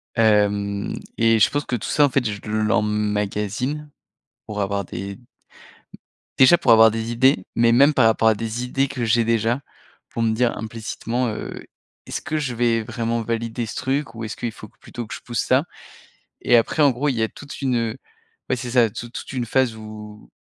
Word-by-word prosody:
hem 105 -2 +2 0.2
et 115 -1 +4
je - - +5
pense 145 0 -2
que 125 - -2
tout 110 - -4
ça, 145 -1 +4
en - - +1
fait, 130 0 +1
je 100 -1 -5
l'emmagasine 105 +5 -1 0.6
pour 105 -1 -3
avoir 100 0 -1
des 100 +5 -7 1.2
déjà, 135 +7 +7
pour 120 - +2
avoir 110 0 +8
des 115 +1 -3
idées, 120 -5 +3
mais 115 0 +4
même 140 +5 +5
par 125 -4 +4
rapport 110 0 +3
à 110 - +6
des 115 +3 -4
idées 135 +2 0
que 130 -3 -3
j'ai 115 +1 +3
déjà, 115 +3 +1 0.5
pour 115 - -2
me 110 - +2
dire, 120 +1 +1
implicitement, 115 +2 -3
heu, 110 - -5 0.4
est-ce - - -4
que 155 - -3
je 130 -5 -3
vais 115 -1 +2
vraiment 115 0 -2
valider 115 +1 -3
ce - - -7
truc 130 -2 -2
ou 110 - -6
est-ce 110 - -5
qu'il 120 -2 -4
faut 110 -1 -11
plutôt 120 +2 -9
que - - -8
je - - -7
pousse 120 -1 -4
ça? 130 +4 +2 0.8
Et 120 - +4
après 120 +7 +2
en 140 -2 +6
gros 140 +4 -1
il 130 - -1
y 115 - -1
a 110 - +2
toute 145 +3 -11
une 115 -4 0 0.5
ouais - - +2
c'est 125 0 -5
ça 120 -3 +4
toute 120 +3 -8
toute - - -7
une 125 -2 -2
phase 125 -1 +1
où, 105 -1 -11
115 Hz, 200 wpm, -22 LUFS, 110-125 Hz, 1.2 s, avoir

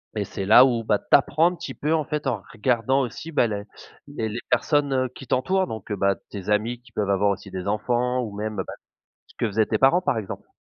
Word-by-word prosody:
Et - - -1
c'est 95 - -5
là 110 +5 +8
où, 120 -3 0
bah, 105 -2 +1
tu - - -28
apprends 160 +4 +2
un 180 - -7
petit - - -7
peu 155 +2 -1
en 155 -3 +1
fait 150 -2 -3
en 115 -7 -1
regardant 125 +3 +1
aussi, 135 +6 -5
bah, 125 -5 +3
les 100 -1 -4 0.4
les 115 -6 -3
les 115 - -4
personnes, 145 -2 +2
heu, 130 -1 +1
qui 135 - -10
t'entourent 185 +11 +1
donc 110 -2 -7
bah, 100 0 +1
tes 100 0 -7
amis 115 +4 0
qui 120 -2 -20
peuvent 105 -2 -2
avoir 100 +1 +3
aussi 100 0 -6
des 95 +1 -6
enfants 125 +4 0
ou 110 -4 -5
même, 105 0 -4
bah, 95 - -4 0.5
ce - - -22
que 115 - 0
faisaient 110 +1 +1
tes 110 - 0
parents 135 +10 +4
par 125 - 0
exemple. 105 -4 -6
115 Hz, 245 wpm, -24 LUFS, 105-135 Hz, 0.5 s, là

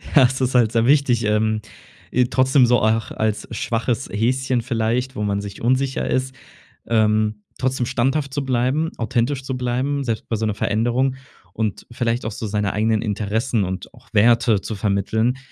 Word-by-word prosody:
Ja, 140 - +8
es 130 +2 +1
ist 130 0 0
halt 115 -3 +4
sehr 115 0 +2
wichtig, 135 -4 +3
ähm, 110 +1 +1 0.5
i 125 0 +4
trotzdem 130 0 +4
so 120 0 +3
auch 110 +1 +1
als 110 -1 -2
schwaches 115 +3 -2
Häschen 125 +3 0
vielleicht, 120 +2 -1
wo 105 - -2
man 100 -1 0
sich 100 -1 -8
unsicher 130 +3 0
ist, 130 0 -1 0.5
ähm, 110 -1 +1
trotzdem 130 -1 0
standhaft 135 +3 0
zu 140 -2 -2
bleiben, 130 +5 +1
authentisch 125 +3 -1
zu 130 -1 -3
bleiben, 130 +3 -1
selbst 115 -3 -3
bei 115 - 0
so 110 - -1
'ner 110 - 0
Veränderung 120 +6 0 0.4
und 110 -2 -3
vielleicht 120 0 -1
auch 110 - -2
so 110 +1 -5
seine 105 -1 -1
eigenen 110 +1 +1
Interessen 110 +2 -1
und 95 0 -6
auch - - -19
Werte 115 -1 +4
zu 110 - -5
vermitteln, 110 +5 0
120 Hz, 175 wpm, -21 LUFS, 110-130 Hz, 0.5 s, Ja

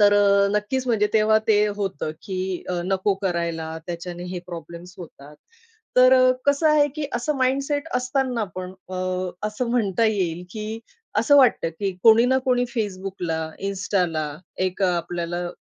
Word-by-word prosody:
तर 205 0 +6
अ, 200 -1 +4
नक्कीच 255 +5 -2
म्हणजे 220 -4 +2
तेव्हा 215 0 +4
ते 210 0 +4
होतं 190 -7 -3
की 185 -1 -3
अ, 180 -1 -1
नको 190 +1 +1
करायला. 170 -3 -2
त्याच्याने 175 0 -6
हे 180 - -3
प्रॉब्लेम्स 170 +1 -9
होतात. 150 -4 -12 0.6
तर 255 +1 +7
अ, 255 0 +5
कसं 285 +3 +3
आहे 300 -1 +5
की 295 -2 -2
असं 275 +5 -1
माइंडसेट 275 +4 0
असतांना 250 -2 0
पण 185 0 -5 0.2
अ, - - -5 0.5
असं 235 +3 -3
म्हणता 225 -3 +1
येईल 180 -5 -1
की 215 +2 -5 0.4
असं 285 - +5
वाटतं 245 -11 +4
की 200 -1 0
कोणी 225 +1 +7
ना 260 +1 +3
कोणी 245 -1 +3
Facebook, 195 -3 -3 0.4
Instaला 180 -5 -1 0.4
एक 185 +2 -4
अ, - - +5
आपल्याला 175 +1 -3
200 Hz, 155 wpm, -23 LUFS, 180-245 Hz, 0.6 s, तर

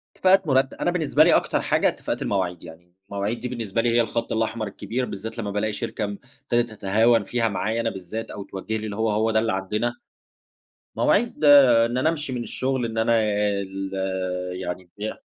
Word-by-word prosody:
اتِّفاقات 190 -2 +4
مرت 135 0 +2
أنا 175 - -1
بالنسبة 155 -3 +3
لي 170 - +5
أكتر - - +1
حاجة - - +2
اتِّفاقات - - -3
المواعيد، 90 -3 -1
يعني 85 +2 -14
المواعيد 100 +3 -2
دي 125 - -4
بالنسبة 115 -3 -2
لي 120 - +1
هي 120 +1 +4
الخطّ 115 0 -2
الاحمر 110 0 -1
الكبير، 115 +5 -3
بالذات 110 +1 -7
لمّا 105 -3 -3
بالاقي 105 +1 -1
شركة 110 - -4
ابتدت 120 +3 -3
تتهاون 110 +3 +2
فيها 115 -2 0
معايا 110 +3 -1
أنا - - 0
بالذّات، 95 +4 -6
أو 100 - -6
توجُّه 105 +4 -4
لي 110 - -5
اللي 105 -2 -5
هو 110 +1 0
هو 110 +2 +1
ده 110 - +3
اللي 110 -1 0
عندنا، 105 +5 -2 1.0
مواعيد 225 -7 +1
إن 125 -5 +6
أنا 145 +5 +2
أمشي 150 -5 -2
من 120 -1 -3
الشُّغل، 130 -1 -1
إن 115 -1 -5
أنا 115 +1 +2 0.5
ال 95 0 -5 0.7
يعني 90 0 -5
ي 110 +1 -3
115 Hz, 190 wpm, -24 LUFS, 100-125 Hz, 1.0 s, إن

